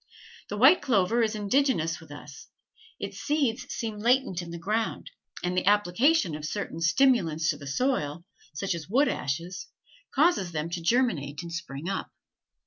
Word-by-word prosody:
The 210 - -4
white 270 - +7
clover 230 -2 +2
is 220 -1 +1
indigenous 210 - +1
with 160 - -15
us; 145 -1 -11 0.5
its - - -6
seeds 275 -5 0
seem 220 -3 -4
latent 240 -5 +2
in 170 - -8
the 170 - -6
ground, 215 - -2 0.3
and 180 +1 -1
the 185 - 0
application 205 - +3
of 150 0 -6
certain 165 0 -4
stimulants 170 - +3
to 145 - -6
the 140 -1 -10
soil, 170 - -1 0.3
such 180 +6 -2
as 165 -1 -7
wood 270 +7 +3
ashes, 170 +7 -4 0.4
causes 275 - +2
them 155 +2 -3
to 175 0 -3
germinate 165 - 0
and 170 0 -7
spring 165 -2 -6
up. 195 0 -3
185 Hz, 160 wpm, -27 LUFS, 165-240 Hz, 0.5 s, white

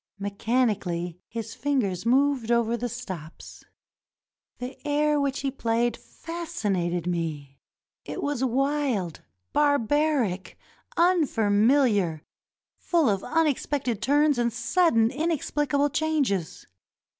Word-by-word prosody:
Mechani 215 +3 0
cally 175 -1 -4
his 225 -1 -6
fingers 240 -8 -1
moved 260 -2 +2
over 235 -1 +2
the 240 +1 -3
stops. 185 -10 -8 0.9
The 250 +1 -6
air 295 0 +2
which 280 -1 -1
he 275 -1 -1
played 235 -2 0
fascinated 205 - -3
me. 155 -6 -3 0.4
It - - -6
was 285 -3 -1
wild, 265 - 0 0.3
barbaric, 285 - +1 0.4
unfamiHar, 225 - +3 0.6
full 335 -7 +2
of 195 -2 0
unexpected 285 -7 0
turns 290 0 +3
and 235 0 +1
sud 320 +8 +2
den 225 0 +4
inexplicable 290 -2 0
changes. 280 - -1
245 Hz, 100 wpm, -26 LUFS, 205-290 Hz, 0.9 s, den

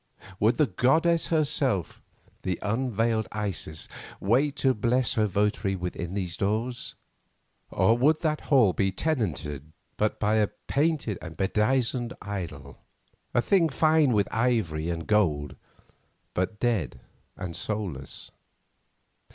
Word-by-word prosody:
Would 110 +3 +3
the 150 - +5
goddess 160 +7 +2
herself, 145 - 0 0.4
the 90 -2 -2
unveiled 115 0 0
Isis, 95 -7 -4 0.3
wait 135 +8 +2
to 135 -2 +2
bless 120 +4 +1
her 110 -4 +2
votary 100 0 0
within 90 0 -4
those 90 -3 -3
doors? 110 +5 -1 0.7
Or 105 +5 +3
would 150 +6 +3
that 155 -2 0
hall 125 - +5
be 95 -1 +1
tenanted 80 - -2 0.2
but 105 0 0
by 105 +1 +2
a 105 -1 +3 0.2
painted 145 - 0
and 80 -2 -9
bedizened 120 +4 +1
idol, 85 -9 -6 0.6
a 120 - +4
thing 175 -5 +3
fine 155 -1 +3
with 105 -3 +2
ivory 105 -10 0
and 85 -1 -3
gold, 75 -10 +1 0.8
but 95 +4 -2
dead 110 - 0 0.4
and 85 -2 -5
soulless? 95 -11 -5
105 Hz, 120 wpm, -27 LUFS, 95-130 Hz, 0.8 s, the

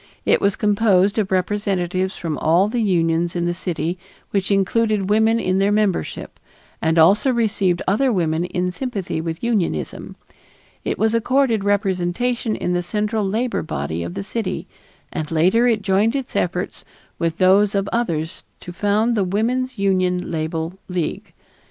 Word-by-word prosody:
It - - +3
was 200 0 +2
composed 205 -1 +2
of 200 -3 0
representatives 185 -1 -1
from 160 -3 -3
all 170 +5 +3
the 235 +2 -1
unions 170 -4 +1
in 175 -1 0
the 175 - 0
city 175 -1 -3 0.3
which 195 -1 0
included 205 0 +1
women 220 +2 +3
in 185 -3 0
their 200 +1 +2
membership 205 -3 -1 0.4
and 160 +1 +1
also 200 +11 +5
received 205 -7 +1
other 250 +7 +2
women 170 -4 0
in 180 0 -2
sympathy 200 -7 -3
with 165 +3 -5
unionism. 195 - -2 0.7
It - - -2
was 220 +1 +1
accorded 235 -2 +2
representation 205 +4 0
in 180 - -2
the 175 - +1
central 210 +4 -1
labor 225 +5 -1
body 80 - -4
of 85 +1 -5
the 100 - -3
city, 185 - -4 0.5
and 155 -1 -3
later 185 +9 +3
it 220 -4 +1
joined 205 +5 +2
its 270 -3 -4
efforts 180 +1 -2 0.4
with 165 0 -1
those 195 +2 +4
of 195 0 0
others 170 -9 -2 0.2
to 175 - -8
found 210 +5 +1
the 210 -4 +1
Woman's 240 +7 -1
Union 185 -2 0
Label 160 +2 -3
League. 180 -4 -3
195 Hz, 155 wpm, -21 LUFS, 175-215 Hz, 0.7 s, also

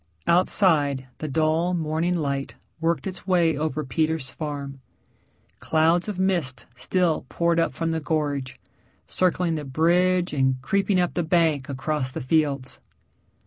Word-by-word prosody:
Outside 155 -7 +3
the 155 - -3
dull 160 +4 +1
morning 165 +2 0
light 140 -3 -2 0.2
worked 165 +1 0
its 185 0 -6
way 170 -4 +3
over 155 0 -2
Peter's 155 +1 -1
farm 140 -3 -6 0.8
clouds 165 +3 +2
of 205 -3 -4
mist 175 -9 0
still 165 +1 0
poured 170 0 +1
up 165 - 0
from 165 0 -1
the 160 - -1
gorge, 145 -4 -2 0.5
circling 180 -2 +1
the 155 -2 -3
bridge 175 +5 +2
and 130 -2 +1
creeping 195 +3 +1
up 175 -1 +1
the 175 - 0
bank 160 -4 +1
across 140 0 -2
the - - -5
fields. 140 -2 0
160 Hz, 140 wpm, -24 LUFS, 140-175 Hz, 0.8 s, Outside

